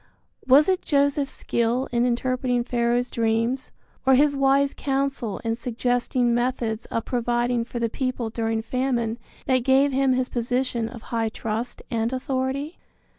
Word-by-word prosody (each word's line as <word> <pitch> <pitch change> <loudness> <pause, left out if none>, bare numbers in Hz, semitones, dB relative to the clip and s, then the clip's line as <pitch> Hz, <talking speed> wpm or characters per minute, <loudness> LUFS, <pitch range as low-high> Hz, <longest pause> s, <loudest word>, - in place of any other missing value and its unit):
Was 275 +4 +7
it 375 -1 +2
Joseph's 280 -1 +1
skill 235 +3 0
in 240 0 +2
interpreting 250 0 0
Pharaoh's 240 0 0
dreams, 230 +3 0 0.3
or 265 0 +5
his 285 +2 +4
wise 275 0 +3
counsel 270 -6 -1
in 225 -1 0
suggesting 245 +1 0
methods 240 -2 -1
of 230 - -3
providing 240 0 0
for 240 - -7
the 235 -1 +1
people 250 -1 -3
during 225 -1 -1
famine 240 -2 -1 0.3
that 260 -1 +3
gave 265 +3 +3
him 265 0 +2
his 255 0 0
position 245 -1 -1
of 235 -2 -10
high 225 -1 +1
trust 225 +2 -4
and 230 0 0
authority? 265 +4 -2
245 Hz, 145 wpm, -24 LUFS, 235-265 Hz, 0.3 s, Was